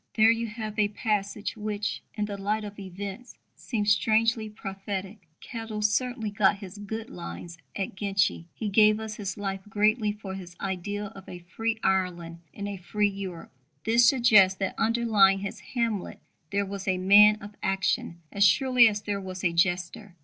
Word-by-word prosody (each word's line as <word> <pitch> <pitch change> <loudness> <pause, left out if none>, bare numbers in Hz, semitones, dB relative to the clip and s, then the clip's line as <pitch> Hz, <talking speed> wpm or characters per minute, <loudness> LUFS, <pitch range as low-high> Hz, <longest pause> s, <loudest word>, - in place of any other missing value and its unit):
There 220 0 +6
you 230 0 -1
have 215 -1 -6
a 210 - +4
passage 205 -1 -2
which, 210 -1 -3
in 210 -1 -1
the 205 -1 -5
light 210 +2 -1
of 205 0 -8
events, 200 +5 -7 0.2
seems 210 -4 -1
strangely 220 +1 +2
prophetic. 195 -1 -6
Kettle 225 -2 -5
certainly 220 +1 0
got 200 0 +3
his 200 0 -10
"good 220 +2 -6
lines" 85 - -8 0.2
at 195 -1 -3
Ginchy. 195 -4 0
He 220 - -4
gave 210 +1 +5
his 215 -2 -5
life 195 -1 -3
greatly 215 +1 +2
for 205 -2 -7
his 180 -2 -9
ideal 200 +2 -4
of 195 -1 -12
a 180 - -7
free 220 +6 -3
Ireland 175 -3 -1
in 200 - -7
a 200 -1 -5
free 205 +3 0
Europe. 190 -4 -7 0.3
This 235 +2 +5
suggests 215 -8 +5
that 195 - -2
underlying 220 -4 +3
his 200 - -5 0.2
Hamlet 230 -5 -1 0.3
there 200 +2 0
was 195 0 -7
a 185 -1 +2
man 205 +3 +7
of 205 0 -10
action 190 -3 -1
as 200 - +2
surely 250 +3 +6
as 210 -1 -2
there 200 -1 -2
was 185 0 -7
a 170 -2 +2
jester. 175 +2 -1
205 Hz, 170 wpm, -27 LUFS, 190-215 Hz, 0.3 s, man